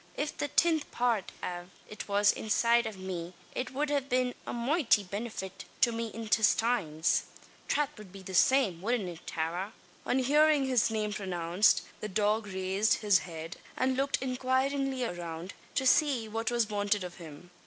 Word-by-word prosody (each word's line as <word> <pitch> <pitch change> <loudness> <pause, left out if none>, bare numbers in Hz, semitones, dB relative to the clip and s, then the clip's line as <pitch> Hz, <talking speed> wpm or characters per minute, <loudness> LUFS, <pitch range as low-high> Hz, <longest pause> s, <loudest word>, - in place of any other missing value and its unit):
If 295 0 -3
the 290 - -2
tinth 320 +1 +2
part 235 -5 0
av 175 0 -5 0.2
it 210 - -8
was 205 0 +4
inside 235 +2 +2
av 215 -3 -7
me, 180 -2 -6 0.2
it 255 0 -3
wud 285 0 -1
be 250 0 +1
a - - -3
moighty 240 -3 +2
binnefit 195 -1 -6 0.2
to 235 - +5
me 230 0 -3
intistines. 215 -6 +1 0.4
Trath 295 -2 0
wud 200 -3 -12
it 190 -1 -11
that 190 - -7
same. 200 -4 +3
Wudn't 220 -1 0
it, 175 -1 -9
Tara?" 175 +6 -3 0.3
On 250 - +2
hearing 295 +2 +4
his 255 -4 +2
name 215 -1 -1
pronounced, 180 -1 +2 0.2
the 215 - -5
dog 210 +2 +1
raised 190 +2 +1
his 200 -3 +6
head 165 -1 -8 0.2
and 260 0 +1
looked 275 +1 +1
inquiringly 260 +1 0
around, 175 -2 -6 0.2
to 265 - +1
see 260 -4 +3
what 225 +1 -2
was 240 -2 +1
wanted 205 -1 0
of 180 -1 -8
him. 170 0 -12
215 Hz, 165 wpm, -30 LUFS, 185-255 Hz, 0.4 s, his